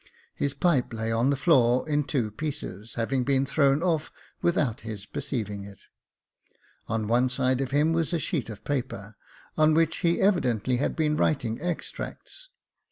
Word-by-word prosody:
His 140 -1 -2
pipe 140 -6 +1
lay 110 0 -2
on 115 +4 +2
the 140 - +2
floor, 130 -4 +3
in 150 -1 +1
two 120 -7 -1
pieces, 115 -6 -6
having 125 +3 0
been 135 0 +2
thrown 140 +2 +2
off 165 -4 0 0.3
without 145 -9 +1
his 105 -2 -7
perceiving 105 -6 -4
it. 100 -1 -12 1.1
On 110 -1 -1
one 120 +3 +3
side 130 0 +1
of 135 - -2
him 150 +4 +2
was 165 -2 0
a 170 - +1
sheet 150 - -2
of 110 -1 -9
paper, 125 -7 -3 0.5
on 155 0 +5
which 165 0 +2
he 170 -2 +1
evidently 130 - +2
had 140 - -1
been 150 -2 +1
writing 120 -7 0
extracts. 180 - -5
135 Hz, 165 wpm, -27 LUFS, 115-155 Hz, 1.1 s, on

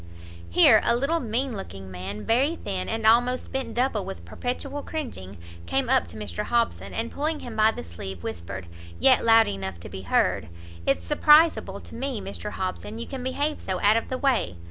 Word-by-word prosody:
Here 215 - +7
a 235 - +3
little 280 +7 +1
mean 245 0 -1
looking 95 - -8
man, 95 +3 -6
very 270 +8 +2
thin, 195 - -4
and 225 0 -2
almost 245 +3 +3
bent 265 -1 -3
double 240 -4 +1
with 85 - -8
perpetual 260 - -4
cringing, 240 - -6 0.3
came 270 -3 0
up 260 -1 +3
to - - -11
Mr 210 0 -4
Hobson, 235 -1 0
and 230 +1 -3
pulling 305 +1 -2
him 235 -2 -7
by 215 0 +5
the - - -5
sleeve, 85 +2 -8
whispered, 95 -2 -6 0.3
yet 255 -2 +5
loud 225 0 +6
enough 95 -3 -4
to - - -9
be 95 - -7
heard, 85 -3 +1 0.4
"It's 135 - +1
surprizeable 300 +2 +4
to - - -13
me, 260 -1 -3
Mr 200 +2 -6
Hobson, 190 +3 -4
you 235 - -4
can 265 -2 -6
behave 285 +4 -1
so 185 -1 -3
out 210 +2 +5
of 230 - -1
the 255 - -2
way! 255 - +1
225 Hz, 190 wpm, -25 LUFS, -, 0.4 s, Here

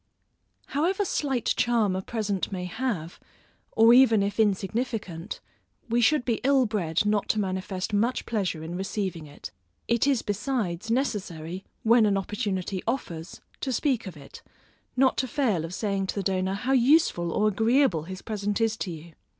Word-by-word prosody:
However 365 +8 +1
slight 270 -8 -1
charm 225 -5 +2
a 190 - -2
present 205 -3 -2
may 180 -2 -3
have, 180 -5 -3 0.5
or 225 +1 +6
if - - +8
even 225 -6 +4
insignificant, 205 -2 -1 0.5
we 235 +1 +2
should 255 +2 +3
be 235 -3 0
ill 270 -1 +4
bred 190 -5 0
not 210 -1 +1
to 215 - +2
manifest 190 +1 -3
much 230 +5 +1
pleasure 190 -8 -2
in 165 +2 -6
receiving 190 -3 -3
it. 145 - -10 0.4
It 235 +3 +2
is 270 -5 +2
besides, 210 -3 -2
necessary, 190 - -2 0.2
when 230 -1 +5
an 200 -1 +2
opportunity 195 -2 -2
offers, 180 -9 -4 0.2
to 265 - -2
speak 250 -3 0
of 175 -5 -8
it, 140 -1 -12 0.6
not 260 0 +4
to 260 - 0
fail 245 - 0
of 165 - -5
saying 195 -3 -1
to - - -3
the 200 - -2
donor, 190 0 0
how 245 +6 -2
useful 250 - +3
or 210 - +2
agreeable 225 - +2
his 185 +1 -8
present 205 -1 -2
is 225 -1 +1
to 195 - -3
you. 165 0 -9
210 Hz, 165 wpm, -26 LUFS, 185-240 Hz, 0.6 s, if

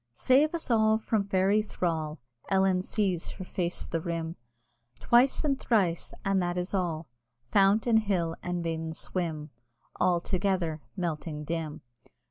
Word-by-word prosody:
Save 290 +6 +3
us 320 -6 -3
all 220 -1 +4
from 220 -2 -1
Fairy 195 +2 +3
thrall! 160 -6 -2 0.3
Ellen 190 -1 +3
sees 190 -3 -1
her 185 - -8
face 175 -1 -2
the 165 - -2
rim 165 0 -3 0.6
Twice 245 +5 +4
and 275 -3 +1
thrice, 185 -8 +1
and 195 -1 +2
that 175 0 -1
is 180 +2 -3
all 170 -4 -1 0.5
Fount 200 +2 +4
and 230 -2 +5
hill 180 -6 0
and 175 -1 -3
maiden 160 -1 -3
swim 160 -4 -3 0.5
All 175 -1 +3
together 180 -4 -1 0.2
melting 155 -3 -3
dim! 160 -1 -4
180 Hz, 140 wpm, -29 LUFS, 165-205 Hz, 0.6 s, and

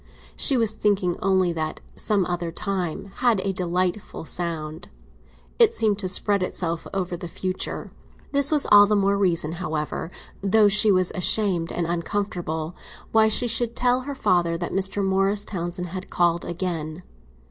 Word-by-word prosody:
She 270 - +4
was 225 -3 +3
thinking 205 -5 0
only 185 -2 +2
that 155 -1 -3
"some 205 -4 0
other 175 -1 -3
time" 190 0 -4
had 240 -5 +3
a 195 0 -1
delightful 180 0 -2
sound; 160 -2 -4 0.7
it - - +5
seemed 210 -3 +1
to 190 - -2
spread 200 +2 +2
itself 170 -2 -3
over 185 -2 -2
the 175 0 -7
future. 185 +2 -4 0.4
This 280 0 +3
was 300 -2 +3
all 205 0 +9
the 210 - +2
more 200 0 +2
reason, 170 -5 0
however, 155 -1 -3 0.3
though 205 +2 +4
she 210 +1 +6
was 185 -2 +2
ashamed 180 -3 +1
and 175 - -2
uncomfortable, 170 -2 -3 0.4
why 220 0 +5
she 220 +3 +1
should 235 0 -1
tell 250 +1 +2
her 280 +2 -6
father 175 -8 +1
that 175 0 -4
Mr. 195 +1 -1
Morris 195 +2 +1
Townsend 180 -2 -4
had 185 +2 -7
called 175 -1 +1
again. 170 -2 -4
185 Hz, 160 wpm, -24 LUFS, 170-205 Hz, 0.7 s, all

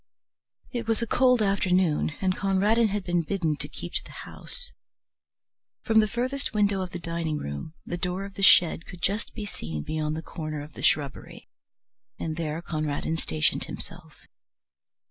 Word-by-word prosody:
It 235 -2 -3
was 225 +1 +2
a - - +1
cold 250 0 +4
afternoon, 185 -6 +2
and 185 -1 +2
Conradin 205 +4 +3
had 205 -1 -2
been 175 -1 +1
bidden 165 -2 0
to 145 - -4
keep 85 -11 -7
to - - 0
the - - -14 0.2
house. - - -3 1.1
From 220 0 +5
the 215 - +4
furthest 255 +3 -1
window 205 -2 +3
of 185 - -3
the 175 - -5
dining 165 -2 -2
room 70 - -5
the 175 - -4
door 180 +2 -1
of 200 - -9
the 195 - -6
shed 170 -4 +6
could 180 - -10
just 205 +4 0
be 215 - -4
seen 80 - -5
beyond 155 -1 -1
the 160 - -4
corner 155 -3 -5
of 150 0 -12
the - - -8
shrubbery, 140 -3 0 0.7
and 160 -1 -2
there 165 0 -3
Conradin 155 0 -1
stationed 80 - +1
himself. - - -9
175 Hz, 170 wpm, -27 LUFS, 155-205 Hz, 1.1 s, shed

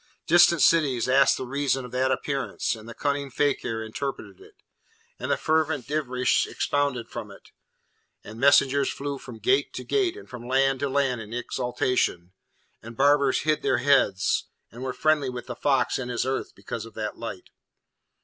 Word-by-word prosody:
Distant 170 -2 +5
cities 140 -8 +3
asked 135 +1 +4
the 130 - -5
reason 135 0 -1
of 125 - -10
that 130 +1 +1
appearance, 140 -2 -2
and 110 +1 -12
the 115 - -9
cunning 140 -1 -1
fakir 120 -4 -1
interpreted 135 - -6
it, 420 +1 -17 0.6
and - - -4
the - - +2
fervent 155 -4 0
dervish 130 -4 +1
expounded 140 -5 -1
from 115 -3 -7
it, 100 - -15 0.7
and 110 +2 -10
messengers 140 0 +4
flew 140 0 -4
from 120 -4 -10
gate 400 - +1
to - - -6
gate 390 -3 0
and 415 - -12
from 120 0 -9
land 135 +1 +2
to 140 - -1
land 135 -3 0
in 110 +2 -8
exultation, 125 -7 -1 0.5
and 115 0 -11
barbers 140 -1 +3
hid 155 0 +1
their - - +1
heads, 135 -10 +2 0.3
and 120 - -11
were 130 0 -2
friendly 145 +1 +1
with 125 -1 -6
the 125 0 -6
fox 135 0 +1
in 125 -1 -5
his 120 0 -1
earth, 135 0 -3
because 115 0 -6
of 115 - -16
that 105 -1 -5
light. 115 -5 -7
130 Hz, 175 wpm, -25 LUFS, 120-145 Hz, 0.7 s, Distant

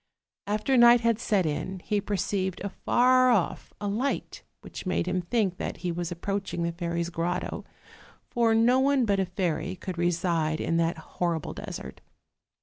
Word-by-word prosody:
After 215 +6 +1
night 240 0 +7
had 230 -1 +2
set 200 -6 +1
in, 160 +5 -2
he 205 +2 -1
perceived 190 -2 -2
afar 255 +6 +3
off 215 -8 0
a 205 - -3
light, 235 +8 -2 0.2
which - - -8
made 185 - 0
him 180 0 0
think 185 0 0
that - - -4
he 175 - +1
was 175 0 -3
approaching 195 0 -3
the 170 - 0
fairy's 170 0 -3
grotto: 175 +2 -3 0.6
for 230 -2 +2
no 240 +3 +4
one 270 -1 +3
but 200 -2 +1
a 190 - 0
fairy 185 0 -2
could 185 -1 -6
reside 170 -2 0
in 165 - 0
that 165 0 +1
hor 170 +1 -2
rible - - -7
desert. - - -8
185 Hz, 165 wpm, -27 LUFS, 170-225 Hz, 0.6 s, night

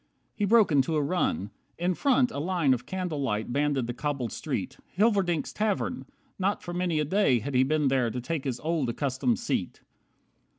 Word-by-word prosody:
He 205 - -1
broke 220 -2 +5
into 145 +2 +2
a 150 - +2
run. 140 - -1 0.3
In 180 +2 +1
front, 255 +3 +2
a - - -4
line 165 -4 +2
Of 125 0 -4
candle 180 -6 -3
light 110 -3 -2
banded 145 -2 +1
the 120 - -4
cobbled 135 -3 -3
street. - - -4 0.2
Hilverdink's 195 -7 +2
tavern! 215 +4 -1 0.3
Not 195 +2 0
for 175 - -6
many 175 -3 0
a 150 - +1
day 155 -6 +3
Had 130 +5 -4
he 125 - +4
been 150 +2 +2
there 130 -3 +2
to 125 - -4
take 150 +3 -3
his 130 -3 -2
old, 155 -5 0
accustomed 140 - 0
seat. 240 - -3
155 Hz, 185 wpm, -27 LUFS, 130-185 Hz, 0.3 s, broke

